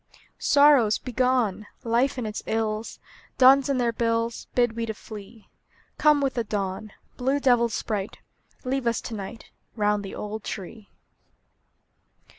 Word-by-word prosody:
Sorrows, 280 -7 +5
begone! 250 -5 0 0.2
Life 240 +4 +1
and 245 - -3
its 215 0 -4
ills, 220 0 -2 0.4
Duns 270 +1 +6
and 270 -2 +1
their 235 -1 +1
bills, 230 0 -1
Bid 240 -2 +2
we 230 0 -3
to 220 - -4
flee. 215 +1 -11 0.5
Come 300 -1 +4
with 275 -1 0
the 235 - -1
dawn, 205 0 -4 0.3
Blue 265 +3 +1
devil 245 -4 +3
sprite; 205 -1 -3 0.5
Leave 260 -1 -1
us 235 - +1
to 235 - -7
night, 215 +2 -8 0.2
Round 210 -1 +1
the 195 - -7
old 210 +1 -6
tree! 200 +2 -7
230 Hz, 140 wpm, -25 LUFS, 215-255 Hz, 0.5 s, Duns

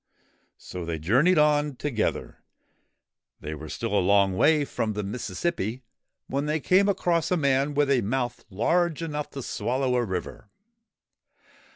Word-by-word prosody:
So 90 -1 -7
they 85 -1 -3
journeyed 130 - +3
on 150 -1 +3
together. 120 -5 -2 1.0
They 75 - -6
were 75 0 -8
still 115 +5 -4
a 100 - +3
long 100 0 +3
way 150 +7 +3
from 110 -5 -2
the 105 0 -3
Mississippi 110 - -3 0.4
when 140 +2 -2
they 155 +1 0
came 190 +6 +3
across 175 -4 +1
a 180 - +2
man 140 -1 +1
with 145 -1 +2
a 130 -3 +3
mouth 120 +3 -2
large 165 - +1
enough 150 -2 -4
to 135 - -7
swallow 125 +5 -1
a 125 - +2
river. 95 0 -5
130 Hz, 150 wpm, -26 LUFS, 105-150 Hz, 1.0 s, journeyed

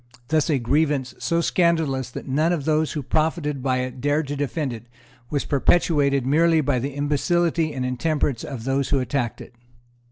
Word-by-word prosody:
Thus 155 0 +2
a 150 - +3
grievance 135 +1 0
so 170 0 0
scandalous 160 -8 +1
that - - -8
none 155 +5 +1
of 160 -6 -1
those 155 0 +1
who 150 -3 -3
profited 155 -1 -1
by 130 -1 0
it 130 0 -6
dared 145 +2 +1
to 145 - -2
defend 145 -1 -2
it 115 +1 -10 0.4
was 145 -2 -1
perpetuated 140 -2 +2
merely 160 +4 +3
by 130 -4 +1
the 135 +3 -4
imbecility 160 +3 +1
and 130 -3 -3
intemperance 135 -1 -1
of 130 -5 -6
those 135 +1 0
who 140 - +2
attacked 125 -1 -2
it. - - -12
145 Hz, 180 wpm, -23 LUFS, 130-160 Hz, 0.4 s, a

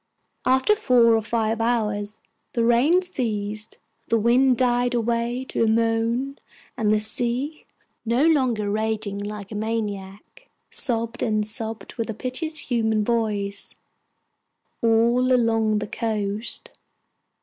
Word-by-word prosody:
After 260 +11 +4
four 245 - +4
or 225 - +1
five 225 0 -1
hours 215 -3 -1 0.4
the 230 -1 +1
rain 275 +11 +4
ceased, 215 - -3 0.3
the 230 - +2
wind 245 +3 +4
died 245 -1 +2
away 235 +2 -1
to - - 0
a - - +3
moan, 230 +4 0 0.4
and 215 -2 +1
the 215 - +3
sea 245 +7 -2 0.4
no 240 +6 +2
longer 255 -10 +2
raging 215 -1 -2
like 205 0 -6
a - - -5
maniac 210 -3 -5 0.2
sobbed 230 -1 0
and 215 -2 +1
sobbed 220 0 -5
with 230 - -2
a 225 - -3
piteous 270 +7 -3
human 220 -2 +2
voice 210 -4 -1 1.1
all 235 +3 +3
along 225 -3 +2
the 210 - -3
coast. 215 -1 -3
230 Hz, 125 wpm, -24 LUFS, 215-245 Hz, 1.1 s, After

